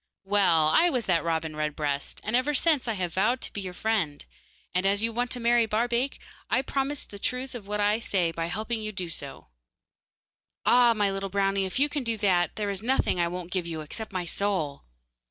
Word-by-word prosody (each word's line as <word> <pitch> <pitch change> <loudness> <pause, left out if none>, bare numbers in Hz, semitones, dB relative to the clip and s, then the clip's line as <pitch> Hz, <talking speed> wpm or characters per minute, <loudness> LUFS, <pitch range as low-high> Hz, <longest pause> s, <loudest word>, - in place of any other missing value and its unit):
'Well, 190 -6 +4
I 340 - +5
was 250 - -1
that 170 -3 +2
robin 160 -2 -1
redbreast, 150 -2 -2
and 220 - -1
ever 270 +4 +2
since 300 -3 +2
I 230 - +1
have 180 -4 -3
vowed 220 +7 +2
to - - -5
be 200 - -3
your 185 -2 -6
friend, 190 -11 -1 0.5
and 180 +2 +2
as 200 +2 +2
you 230 0 +1
want 245 +2 -1
to 245 - -2
marry 235 -1 +3
Barbaik, 235 +4 0 0.3
I - - +3
will 260 - +1
prove 275 +1 -2
the 200 - -9
truth 255 +5 -2
of 225 -5 -8
what 210 0 -2
I 210 +2 +2
say 185 -7 0
by 165 0 -3
helping 220 +5 -2
you 215 0 -4
to - - -22
do 180 -3 -3
so.' 140 - -8 1.2
'Ah! 240 -1 +6
my 205 -2 +2
little 195 0 -3
brownie, 195 0 +1
if 190 - -3
you 285 +2 +4
can 290 -1 -3
do 230 -2 -1
that, 185 -4 +2
there 210 -1 -1
is 195 0 -3
nothing 245 -6 +1
I 170 - +3
won't 180 0 -6
give 180 -2 -1
you, 160 -2 -4
except 215 +9 -6
my 185 -2 -2
soul. 170 -6 -2
200 Hz, 225 wpm, -27 LUFS, 175-235 Hz, 1.2 s, Ah